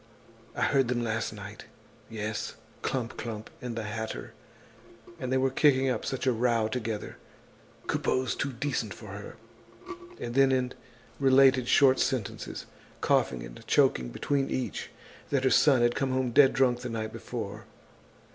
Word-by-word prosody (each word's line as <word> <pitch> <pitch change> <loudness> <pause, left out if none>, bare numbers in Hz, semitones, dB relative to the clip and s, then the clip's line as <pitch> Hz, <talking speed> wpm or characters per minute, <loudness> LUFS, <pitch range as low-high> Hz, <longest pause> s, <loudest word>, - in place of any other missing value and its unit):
I - - 0
heard 135 -3 +3
them 120 -1 0
last 110 -1 -1
night. 105 0 -9 0.4
Yes, 110 -1 -4 0.3
Clump 125 -3 -2
clump 110 -2 -6
and 125 -2 -5
the 115 - -3
hatter. 110 +1 -5 0.9
And 130 -3 -3
they 130 - +3
were 130 0 +2
kicking 135 -1 +4
up 120 - -3
such 130 - -2
a 130 - +4
row 115 -1 +2
together! 110 -2 -4 0.7
Coupeau's 130 0 0
too 140 - -2
decent 135 +4 -2
for - - -11
her." - - -8 0.8
And 120 0 -5
she 130 -2 +3 0.4
related 135 -1 +6
in 125 - -5
short 135 -1 +5
sentences, 110 -5 -2 0.3
coughing 60 -2 +1
and - - -10
choking 60 -1 +3
between 135 - -1
each, 130 - -3 0.4
that 135 -2 +1
her 130 - +3
son 135 -5 +5
had 120 0 +3
come 135 - -1
home 130 -1 0
dead 135 +2 +6
drunk 125 -2 +3
the 125 0 -5
night 110 -1 -4
before. - - -6
125 Hz, 155 wpm, -29 LUFS, 110-130 Hz, 0.9 s, related